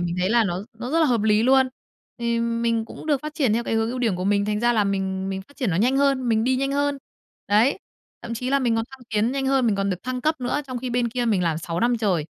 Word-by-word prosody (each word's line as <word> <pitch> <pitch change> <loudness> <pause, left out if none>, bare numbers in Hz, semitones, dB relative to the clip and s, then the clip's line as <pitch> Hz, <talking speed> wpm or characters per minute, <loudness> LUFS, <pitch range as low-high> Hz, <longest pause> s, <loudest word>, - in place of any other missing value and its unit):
mình 175 0 -2
thấy 185 - +1
là 235 0 +4
nó 185 +1 -3
nó 250 +2 -5
rất 330 - +2
là 315 - +4
hợp 235 -5 +1
lý 215 0 +3
luôn. 265 +1 +4 0.5
Thì 235 0 0
mình 230 -1 0
cũng 270 - -11
được 290 -4 +1
phát 305 0 -6
triển 270 -9 +1
theo 235 +2 0
cái - - -1
hướng 225 +1 +1
ưu 255 - -4
điểm 225 -7 0
của 180 - -3
mình, 200 +1 +2
thành 210 0 -1
ra 240 +1 +3
là 215 -3 +2
mình 190 -1 -2
mình 190 0 -4
phát 285 +8 -23
triển 245 -8 -1
nó 165 - 0
nhanh 250 +7 +2
hơn, 275 -3 +2
mình 220 -1 +2
đi 255 +1 +2
nhanh 275 +1 -1
hơn. 285 0 0 0.5
Đấy, 225 - +3 0.4
thậm 235 - -5
chí 250 +3 -3
là 275 - +3
mình 245 -4 +1
còn 225 - 0
thăng 265 - -13
tiến 220 +2 +1
nhanh 270 -1 -1
hơn, 265 -2 +2
mình 210 -3 +2
còn 195 0 0
được 180 - -4
thăng 255 +1 -3
cấp 310 0 0
nữa 250 +4 -1
trong 255 -2 -4
khi 255 0 -4
bên 240 0 +1
kia 245 +1 -2
mình 210 -6 +1
làm 165 -2 0
6 170 +1 -4
năm 240 0 +2
trời, 185 -8 +1
235 Hz, 300 wpm, -23 LUFS, 205-260 Hz, 0.5 s, là